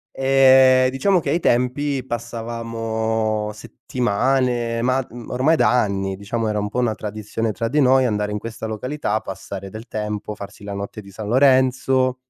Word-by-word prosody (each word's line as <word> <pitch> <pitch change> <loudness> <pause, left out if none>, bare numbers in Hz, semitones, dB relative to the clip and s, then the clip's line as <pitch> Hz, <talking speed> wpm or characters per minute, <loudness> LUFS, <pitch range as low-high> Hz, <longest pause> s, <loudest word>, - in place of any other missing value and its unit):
e 130 -1 +5
diciamo 180 +8 +2
che 145 -3 -2
ai 170 - +2
tempi 130 +1 0
passavamo 115 -2 -2
settimane, 120 +1 -1
ma 130 +2 +2
d - - -14 0.2
ormai 130 +6 +2
da - - +3
anni, 95 -2 -2
diciamo 110 +3 -3
era 105 -1 0
un 105 - -2
po' 110 - -6
una 120 -3 +1
tradizione 110 +1 -4
tra 115 +2 -3
di 145 +4 +1
noi 130 0 +4
andare 105 -3 -1
in 105 - -2
questa 110 0 -6
località, 110 0 -2
passare 95 -1 -7
del 110 +3 -9
tempo, 105 0 -4
farsi 100 +1 -10
la 100 0 -6
notte 100 +2 -6
di 100 - -14
San 105 +2 -7
Lorenzo 130 0 +3
115 Hz, 165 wpm, -21 LUFS, 105-130 Hz, 0.2 s, e